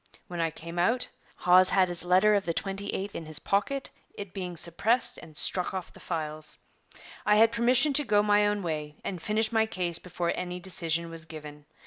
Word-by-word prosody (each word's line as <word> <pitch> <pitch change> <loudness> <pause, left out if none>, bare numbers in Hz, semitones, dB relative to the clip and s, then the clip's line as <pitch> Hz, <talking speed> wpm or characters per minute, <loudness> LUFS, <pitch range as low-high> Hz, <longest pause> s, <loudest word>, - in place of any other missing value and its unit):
When 175 -1 -4
I 165 - +1
came 165 +2 -7
out, 235 +8 +2 0.3
Hawes 185 +1 +5
had 190 -1 +4
his 175 -1 -1
letter 185 +4 +4
of 200 -1 +2
the 170 - -2
28th 195 0 -3
in 160 - -6
his 155 -1 -4
pocket, 270 - -1 0.2
it 200 -3 -8
being 180 -3 -5
suppressed 220 +10 +2
and 155 -2 -13
struck 180 +1 0
off 185 -2 -5
the - - -14
files. 155 -2 -4 0.7
I 210 - +4
had 225 +1 +6
permission 250 +5 +4
to 295 - +5
go 210 -5 +3
my 205 0 +4
own 205 -1 -1
way 150 -3 -4
and 180 -4 -4
finish 215 +4 0
my 220 -1 +2
case 180 -6 -2
before 175 -1 -2
any 180 0 -4
decision 170 -2 -1
was 165 0 -4
given. 150 -2 -10
180 Hz, 195 wpm, -28 LUFS, 165-210 Hz, 0.7 s, had